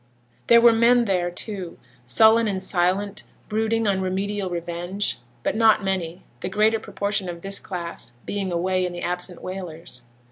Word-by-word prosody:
There 235 - +8
were 235 -1 +7
men 235 +1 +4
there, 180 -4 +1
too, 185 -1 -5 0.3
sullen 220 - +5
and 190 -2 -2
silent, 195 +3 0 0.3
brooding 220 +1 0
on 195 -2 +1
remedial 195 +1 -2
revenge; 175 +3 -3 0.2
but - - 0
not 220 -2 +4
many, 185 -2 -2 0.2
the - - -4
greater 215 +3 +2
proportion 200 -3 -2
of 170 -1 -7
this 195 0 0
class 170 - -6
being 195 -2 -3
away 185 +2 0
in 180 -1 -2
the 175 - -6
absent 180 0 -3
whalers. 170 -8 -7
190 Hz, 155 wpm, -23 LUFS, 175-210 Hz, 0.3 s, There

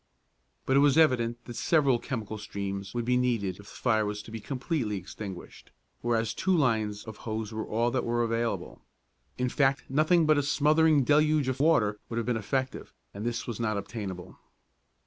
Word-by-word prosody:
But 135 - +2
it - - +6
was 145 0 +4
evident 120 -6 +2
that 120 - -8
several 135 -1 +3
chemical 110 -5 -5
streams 100 -1 -5
would 120 -1 -1
be 125 +1 +2
needed 120 -6 +1
if 100 - -13
the - - -13
fire 110 -4 +2
was 105 0 -4
to 110 - -12
be 115 - -5
completely 125 - -2
extinguished, 95 0 -9 0.3
whereas 115 -2 0
two 190 -2 +1
lines 110 -7 +1
of 110 -2 -9
hose 110 -1 -4
were 110 0 -4
all 115 +2 +1
that 125 0 0
were 120 0 0
available. 115 0 -2 0.6
In 125 - 0
fact 135 +2 +1
nothing 155 +4 +3
but 155 -1 +4
a - - +2
smothering 150 +1 +3
deluge 150 0 +3
of 130 - -3
water 115 -9 +3
would 115 - -4
have 115 - -1
been 125 - 0
effective, 130 +4 -3 0.2
and 100 - -6
this 115 0 -2
was 120 -2 -5
not 110 -3 0
obtainable. 100 -4 -6
120 Hz, 185 wpm, -28 LUFS, 110-140 Hz, 0.6 s, it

